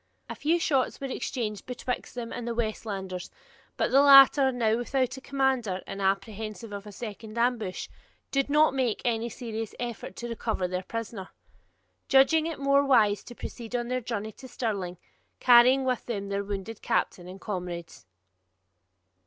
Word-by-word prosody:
A - - -2
few 325 +4 +1
shots 275 -6 0
were 275 - -4
exchanged 230 -5 -4
betwixt 250 0 -4
them 235 -2 -5
and 240 - -5
the 235 - -2
Westlanders; 200 -5 -3 0.5
but - - 0
the 275 - +6
latter, 275 -1 +8
now 225 -3 +1
without 255 +1 -1
a 265 - -10
commander, 260 -9 0
and 195 - -6
apprehensive 215 +3 -2
of 200 +1 -7
a - - -8
second 215 +1 -8
ambush, 235 -5 0 0.4
did 275 0 +1
not 300 +1 +4
make 255 -5 -1
any 235 -1 0
serious 225 -2 -6
effort 235 -5 -5
to 240 - -6
recover 220 -5 -2
their 180 0 -2
prisoner, 225 -1 -6 0.8
judging 310 +4 +5
it 330 - -4
more 275 0 +3
wise 220 -7 +3
to 240 - -10
proceed 235 0 -7
on 240 0 -2
their 255 0 -1
journey 220 -2 -4
to 260 - -12
Stirling, 200 -8 -3 0.4
carrying 250 +2 +6
with 255 -2 -1
them 200 -4 -3
their 200 0 -1
wounded 200 +2 -5
captain 175 -1 -1
and 185 +1 -9
comrades. 175 - -6
230 Hz, 160 wpm, -28 LUFS, 205-260 Hz, 0.8 s, latter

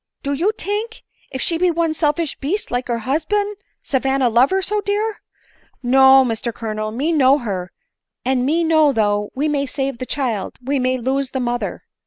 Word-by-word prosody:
— - - -52
Do 280 - -1
you 345 +9 +1
tink, 430 +3 -3 0.3
if 260 - -3
she 330 -1 +1
be 365 0 +3
one 335 -1 0
selfish 310 0 -1
beast 355 +10 -2
like 245 +1 -1
her 235 -2 -2
husban, 330 - 0 0.3
Savanna 265 -1 +1
love 240 +4 +4
her 385 - +1
so 420 +2 0
dear? 415 +2 -2 0.6
No, 265 +1 +6
Mr 235 0 -2
Colonel, 215 -1 -4
me 270 +9 -1
know 275 -3 +5
her, 195 -8 -4 0.5
and 255 -1 +1
me 320 +6 +1
know 315 -2 +4
though 205 -2 +1
we 285 +4 0
may 285 -2 0
save 270 -2 -3
the 255 - -5
child 235 -9 -2
we 270 +2 -1
may 255 0 +1
lose 265 +2 -1
the 265 - -3
mother." 240 -1 -3
270 Hz, 190 wpm, -20 LUFS, 245-325 Hz, 0.6 s, No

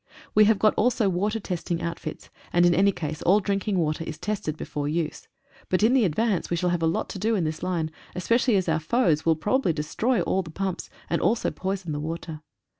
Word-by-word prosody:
We 215 0 +6
have 220 0 +4
got 215 +1 +4
also 230 -2 +2
water 205 +5 0
testing 175 -3 -3
outfits, 170 -2 -6 0.2
and 175 0 +4
in 175 - +5
any 200 +3 +4
case 155 -4 -5
all 195 +4 +4
drinking 200 0 -1
water 155 -1 0
is 160 -1 -6
tested 195 -8 -3
before 145 -2 -4
use, 155 +1 -3 0.4
but 185 +2 +1
in 230 +3 +5
the 260 -5 +4
advance 195 +3 0
we 170 - 0
shall 180 +1 +1
have 175 -1 0
a 165 - +2
lot 160 - -1
to 195 - -6
do 220 +3 +1
in 190 - 0
this 155 0 -3
line, 170 -4 -1 0.2
especially 230 +5 +2
as 185 -2 +1
our 160 -1 +2
foes 160 -3 +1
will 165 - +5
probably 205 - +1
destroy 185 +10 0
all 190 - +1
the 170 - -9
pumps, 190 +2 -4 0.2
and 170 - 0
also 230 +3 +1
poison 190 -3 -3
the 145 - -2
water. 160 0 -5
180 Hz, 220 wpm, -25 LUFS, 160-210 Hz, 0.4 s, We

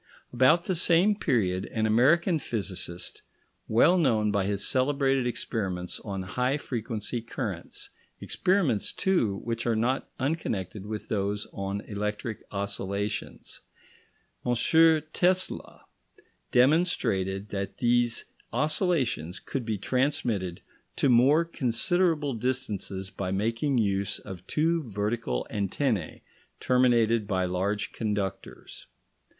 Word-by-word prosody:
About 130 +8 +5
the 185 - -1
same 180 +4 +4
period 100 - 0
an 110 -1 -1
American 155 - +4
physicist, 95 -8 -4 0.5
well 170 +11 +5
known 110 -9 +2
by 100 -1 +1
his 100 0 -1
celebrated 135 -1 +2
experiments 95 -7 -3
on 100 -3 -5
high 125 +8 0
frequency 115 -3 -4
currents 110 -6 -5 0.3
experiments, 180 - +1
too, 120 - +1
which 115 0 -3
are 115 - +2
not 120 +4 0
unconnected 110 - -2
with 105 0 -5
those 105 0 -1
on 100 +1 -3
electric 105 +2 -4
oscillations, 100 +1 -3 0.8
M. 125 - +1 0.6
Tesla, 185 +1 0 0.7
demonstrated 120 - +2
that 100 -1 -4
these 120 -1 +2 0.3
oscillations 135 - 0
could 130 -4 -4
be 110 -2 0
transmitted 115 - -1 0.3
to 140 - +2
more 135 +7 +5
considerable 155 +2 +1
distances 105 -6 -3
by 95 -2 -4
making 115 +8 0
use 100 -3 +1
of 95 -2 -10
two 165 +2 +1
vertical 105 - -2
antennae, 100 - -1 0.4
terminated 115 -4 +3
by 95 -2 0
large 95 +3 -1
conductors. 100 -3 -4
115 Hz, 105 wpm, -28 LUFS, 100-135 Hz, 0.8 s, About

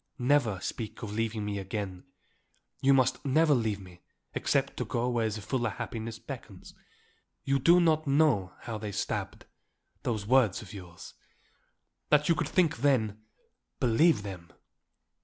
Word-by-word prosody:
Never 125 -6 +2
speak 110 +4 -5
of 105 -2 -5
leaving 110 -1 -2
me 100 -1 -2
again. 95 -1 -5 0.8
You 135 - +4
must 130 -1 +3
never 150 +3 +4
leave 110 -5 0
me 90 -2 -14 0.3
except - - 0
to - - -2
go 120 +1 -1
where 115 -2 +1
a - - -3
fuller 115 +4 -2
happiness 110 +2 -5
beckons. - - -10 0.7
You 135 0 +1
do 170 +6 +6
not 155 -3 +2
know 140 -10 +3
how 110 -2 -5
they 105 -1 -5
stabbed - - -3 0.6
those 110 -4 -2
words 115 -4 +3
of 100 - -12
yours. 90 -4 -10 1.0
That 150 0 +4
you 170 - +5
could - - -2
think 175 -7 +2
them, 115 -6 +1 0.6
believe 125 +1 +3
them! 90 -4 -8
115 Hz, 145 wpm, -29 LUFS, 100-135 Hz, 1.0 s, do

